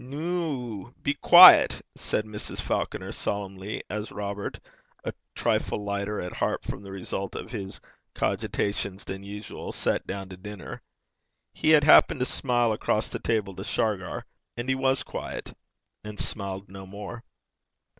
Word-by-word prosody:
'Noo, 135 - -3
be 145 - +2
douce,' 180 +1 +9
said 105 - -2
Mrs. 105 -1 -6
Falconer, - - -2
solemnly, 100 0 -4
as 105 0 -4
Robert, 100 0 -4 0.4
a - - -3 0.2
trifle 105 - 0
lighter 100 +1 -2
at 90 - -5
heart - - -1
from - - -5
the 100 - -10
result 95 0 -4
of - - -6
his 95 -4 -6 0.4
cogitations 100 -1 -1
than 95 0 -6
usual, 105 +1 -7
sat - - -1
down 95 0 -4
to 90 - -9
dinner: 105 +1 -8 0.7
he - - 0
had 155 -2 +7
happened 150 -2 +7
to 125 - +1
smile 120 -3 +2
across 110 0 0
the - - -4
table 105 -4 0
to 95 - -6
Shargar. 100 -4 -1 0.3
And 120 +2 -3
he - - +4
was 130 0 +1
douce, - - -6 0.5
and 105 0 -8
smiled 100 -1 -4
no 95 0 -10
more. 105 +4 -8
105 Hz, 145 wpm, -27 LUFS, 100-120 Hz, 0.7 s, douce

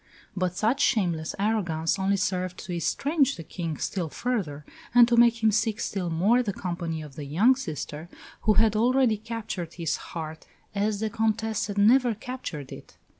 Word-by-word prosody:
But 180 -1 -1
such 240 +6 +1
shameless 170 - +1
arrogance 195 -5 0
only 195 +1 +2
served 185 -1 -1
to 180 - -5
estrange 280 - +1
the 165 - -8
King 165 -2 -5
still 175 -5 -2
further, 170 - -3 0.3
and 240 -1 +8
to 240 - +2
make 235 -1 +4
him 220 - +5
seek 220 +1 0
still 190 -6 -2
more 200 +10 +3
the 220 -5 -2
company 170 -6 -4
of 150 -2 -11
the 150 -2 -6
young 200 - +4
sister, 160 - -6 0.3
who 215 - +3
had 220 0 +4
already 245 0 +3
captured 215 -6 -5
his 165 -3 -1
heart 160 -1 -7 0.3
as 205 +1 -1
the 220 -1 -1
Comtesse 220 -1 0
had 205 -1 -5
never 235 +3 +5
captured 205 - -7
it. - - -11
205 Hz, 175 wpm, -26 LUFS, 170-230 Hz, 0.3 s, and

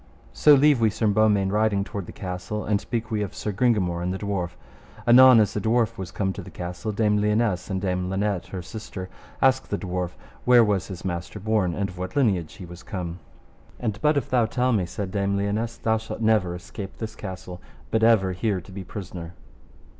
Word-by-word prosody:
So 150 -1 +6
leave 140 -2 +4
we 110 - +5
Sir 110 +2 -2
Beaumains 105 -2 +3
riding 105 -1 +2
toward 100 -3 -6
the - - -7
castle, 90 +3 -5
and 100 -1 +1
speak 115 -1 -4
we 105 -1 0
of 100 - -4
Sir 105 - -3
Gringamore 100 -6 +1
and 90 +1 -1
the 95 - -2
dwarf. 95 -3 -3 0.5
Anon 125 0 +9
as 105 - +2
the 105 - -2
dwarf 115 +1 +1
was 95 -3 -5
come 95 +1 -2
to - - -7
the - - -10
castle, 90 +5 -5
Dame 105 0 +2
Lionesse 105 -3 +1
and 95 -1 -1
Dame 90 -1 -1
Linet 95 -1 -1
her 90 -2 -6
sister, 95 -1 -7 0.3
asked 130 0 +3
the 100 - -1
dwarf 90 -2 -3 0.3
where 125 -1 +7
was 100 -5 0
his 95 -2 -8
master 90 +2 -4
born, 105 -4 +1
and 100 -1 -1
of 90 -1 -11
what 90 0 -5
lineage 100 - +1
he 90 - -9
was 85 +1 -11
come. 90 -2 -5 0.6
And 110 -3 -3
but 150 0 +3
if 135 - -1
thou 120 -3 +2
tell 125 +2 +1
me, 95 -5 +1
said 95 +2 -5
Dame 100 0 0
Lionesse, 105 +4 -1
thou 110 0 +1
shalt 110 - -7
never 105 -6 +2
escape 95 +3 -8
this 110 -1 -6
castle, 95 -3 -8 0.3
but 110 - +2
ever 110 -5 +4
here 95 +1 -1
to 90 - -14
be 95 0 -6
prisoner. 90 -2 -7
100 Hz, 210 wpm, -25 LUFS, 90-110 Hz, 0.6 s, Anon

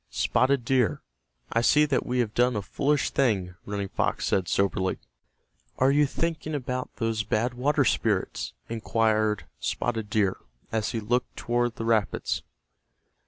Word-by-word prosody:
"Spotted 130 -1 +1
Deer, 130 -3 +1 0.5
I 115 - +3
see 150 +5 +5
that 140 -4 0
we 125 - -1
have 110 -3 -2
done 125 0 +3
a 105 - -2
foolish 140 +6 0
thing," 100 -9 +1
Running 100 -1 -2
Fox - - -1
said, 95 -3 +1
soberly. 95 -1 +1 0.8
"Are 130 +1 +4
you 145 +1 +4
thinking 155 0 -2
about 130 -2 -3
those 115 -2 -1
Bad 110 +3 0
Water 135 +4 +2
Spirits?" - - 0
inquired 110 -2 +1
Spotted 110 -3 -2
Deer, 100 -3 +1 0.3
as 110 -1 0
he 115 - -2
looked 120 +4 -1
toward 120 0 0
the 115 - -4
rapids. 110 -3 +1
115 Hz, 145 wpm, -27 LUFS, 110-130 Hz, 0.8 s, see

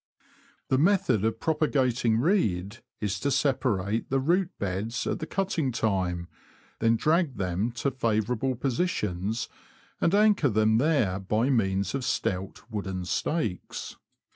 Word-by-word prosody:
The 130 - +3
method 155 - +3
of 110 0 0
propagating 130 -7 +1
reed, 115 - +1 0.2
is 100 -3 -2
to 140 - 0
separate 115 -7 0
the 135 - +2
•root 175 +7 +2
beds 100 +6 -2
at - - -1
the 160 - -5
cutting 180 -8 -1
time, 95 -6 -1 0.5
then 115 0 +3
drag 155 +1 +1
them 95 +5 -1
to 135 +3 -1
favourable 115 +1 0
posi 135 +8 0
tions, 105 - -2 0.5
and 170 - +3
anchor 205 -8 +4
them 110 0 +3
there 125 - +2
by 110 +7 +1
means 95 -5 +1
of 135 -1 -2
stout, 95 -6 -2
wooden 95 -4 -3
stakes. 110 - -2
115 Hz, 135 wpm, -27 LUFS, 100-140 Hz, 0.5 s, anchor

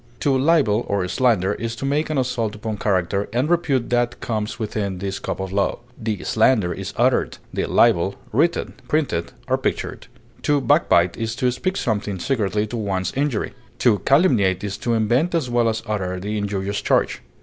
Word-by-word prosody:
To 140 -2 +2
libel 130 -6 +3
or 100 -2 0
slander 105 -3 +2
is 115 +1 -4
to 135 - -5
make 145 +3 0
an 155 - -1
assault 125 -5 -1
upon 105 0 -4
character 100 0 0
and 125 +5 +1
repute 150 -8 +1
that 120 0 +1
comes 110 -2 -3
within 105 -4 -3
the 95 +1 -3
scope 95 - -4
of 95 -1 -4
law; 100 0 +1 0.2
the 110 -2 -3
slander 110 -5 +3
is - - -5
uttered, - - +2 0.2
the - - -1
libel 100 -5 +3 0.2
written, 160 +9 +1
printed, 135 - 0 0.2
or - - +1
pictured. - - -3 0.3
To 145 -1 +2
backbite 115 - +3
is 115 0 -2
to 125 +2 +1
speak 185 +10 -2
something 105 -3 -1
secretly 105 -1 0
to 120 +3 -5
one's 95 -4 -2
injury; 135 -4 -1 0.2
to 110 -5 +3
calumniate 115 - +3
is 100 -1 -3
to 120 -1 0
invent 120 +11 +2
as 140 -7 -1
well 120 -1 +3
as 110 0 -3
utter 95 -4 -2
the 105 +3 -3
injurious 100 -1 -2
charge. - - +1
110 Hz, 180 wpm, -22 LUFS, 100-130 Hz, 0.3 s, libel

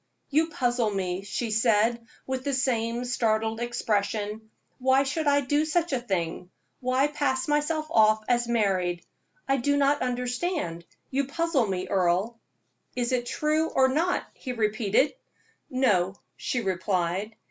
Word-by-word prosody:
"You 315 +3 +3
puzzle 245 -6 0
me," 190 -2 -2
she 220 +3 -3
said, 225 +1 +2 0.2
with 260 -1 -3
the 280 -1 0
same 240 -2 0
startled 225 -2 0
expression. 220 -2 -2 0.3
"Why 260 +1 +4
should 290 +3 -2
I 285 0 +4
do 290 +3 +1
such 320 0 0
a 260 - +1
thing 180 -6 -3 0.3
why 255 +1 +2
pass 285 -3 -1
myself 300 +1 +1
off 215 -2 +4
as 240 -1 +2
married? 185 -7 0 0.4
I 270 - +2
do 285 +3 +1
not 285 +1 +3
understand 250 - -2 0.3
you 275 +1 +1
puzzle 290 -4 0
me, 185 -1 -2
Earle." 190 +5 +1 0.6
"Is 245 -1 -1
it 245 -1 0
true, 305 +4 +1
or 260 0 +3
not?" 330 +7 +1
he 255 - -6
repeated. 215 +3 +1 0.6
"No," 200 -8 +2 0.2
she 245 - -2
replied. 190 +1 -1
240 Hz, 140 wpm, -27 LUFS, 210-275 Hz, 0.6 s, Why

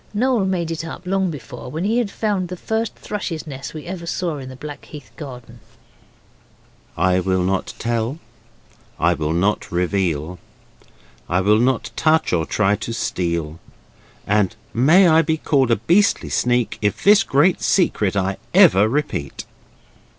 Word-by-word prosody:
Noel 240 -2 +2
made 175 -3 -1
it 165 0 -4
up 165 +2 -8
long 190 0 0
before, 140 -5 -8
when 160 +6 -4
he 225 +4 +1
had 235 -4 -1
found 200 -4 -1
the 180 +1 -7
first 220 +4 -2
thrush's 190 -6 -5
nest 135 0 -8
we 155 - -7
ever 170 -1 -6
saw 170 -4 -2
in 130 -1 -8
the 130 - -9
Blackheath 145 -3 -10
garden: 125 -5 -10 1.4
'I 90 +2 +2
will 95 0 0
not 95 +1 -2
tell, 115 +4 -2 0.8
I 85 +2 +3
will 80 -2 -2
not 95 +6 0
reveal, 90 -2 -1 0.9
I 90 +2 +2
will 105 +3 +3
not 125 0 0
touch, 160 - +2
or 80 -2 0
try 105 -1 +2
to 115 - -5
steal; 85 -6 -2 0.7
And 105 0 +1 0.2
may 160 +11 +5
I 160 0 +5
be 160 0 0
called 135 -5 +1
a 115 - +4
beastly 170 - +2
sneak, 120 -3 0
If 105 -1 -1
this 205 0 +6
great 170 0 +2
secret 105 - +1
I 95 0 -1 0.2
ever 100 +4 +6
repeat. 140 - -3
130 Hz, 155 wpm, -20 LUFS, -, 1.4 s, this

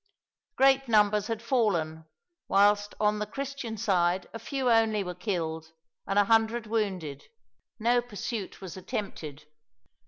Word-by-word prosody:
Great 270 0 +4
numbers 210 -2 +3
had 225 0 -3
fallen, 175 - 0 0.4
whilst 205 +1 +3
on 210 0 +2
the 210 - -2
Christian 275 -2 -5
side 180 -2 +1
a 230 - -6
few 270 0 -3
only 225 -3 +3
were 180 -1 -5
killed, 165 -4 -3 0.3
and 195 - 0
a 205 - +7
hundred 225 +2 +2
wounded. 190 -10 -2 0.5
No 240 +2 +2
pursuit 215 -3 -6
was 185 -3 -7
attempted. 160 -6 -6
210 Hz, 130 wpm, -28 LUFS, 180-230 Hz, 0.5 s, a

